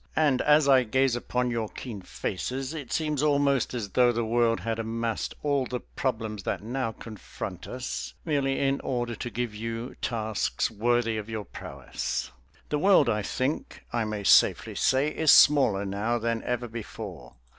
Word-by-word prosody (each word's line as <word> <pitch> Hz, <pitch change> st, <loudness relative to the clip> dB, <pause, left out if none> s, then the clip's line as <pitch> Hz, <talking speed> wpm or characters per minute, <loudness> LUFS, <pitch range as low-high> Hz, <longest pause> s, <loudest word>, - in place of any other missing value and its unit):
And 145 Hz, -5 st, +3 dB
as 150 Hz, -1 st, +5 dB
I 135 Hz, -2 st, +6 dB
gaze 130 Hz, +2 st, +2 dB
upon 125 Hz, 0 st, -1 dB
your 115 Hz, -2 st, -2 dB
keen 110 Hz, -6 st, -7 dB
faces 125 Hz, -, -4 dB
it 145 Hz, -6 st, -7 dB
seems 150 Hz, -3 st, 0 dB
almost 140 Hz, -3 st, +2 dB
as 110 Hz, -4 st, -3 dB
though 125 Hz, +4 st, +4 dB
the 115 Hz, -1 st, -1 dB
world 115 Hz, 0 st, +2 dB
had 115 Hz, 0 st, -2 dB
amassed 115 Hz, 0 st, -2 dB
all 140 Hz, -3 st, +1 dB
the 125 Hz, -1 st, -4 dB
problems 110 Hz, -5 st, -3 dB
that 95 Hz, -, -3 dB
now 120 Hz, +1 st, -2 dB
confront 110 Hz, -2 st, -8 dB
us 65 Hz, -2 st, -5 dB
merely 135 Hz, -3 st, +1 dB
in 140 Hz, 0 st, +1 dB
order 120 Hz, -2 st, -2 dB
to 120 Hz, -, -4 dB
give 120 Hz, -2 st, -3 dB
you 115 Hz, +3 st, -5 dB
tasks 110 Hz, -4 st, -1 dB
worthy 115 Hz, +1 st, +1 dB
of 110 Hz, +1 st, -5 dB
your 110 Hz, -2 st, -4 dB
prowess. 70 Hz, -, -5 dB, 0.4 s
The 150 Hz, -, 0 dB
world, 180 Hz, -7 st, +5 dB
I 105 Hz, -2 st, +1 dB
think 130 Hz, +8 st, -3 dB
I 120 Hz, -1 st, +1 dB
may 105 Hz, -1 st, -3 dB
safely -, -, +5 dB
say, 135 Hz, +3 st, +2 dB
is 160 Hz, 0 st, 0 dB
smaller 115 Hz, -9 st, +6 dB
now 105 Hz, +5 st, -1 dB
than 115 Hz, 0 st, -1 dB
ever 125 Hz, 0 st, -1 dB
before. 105 Hz, -, -8 dB
120 Hz, 165 wpm, -27 LUFS, 110-135 Hz, 0.4 s, I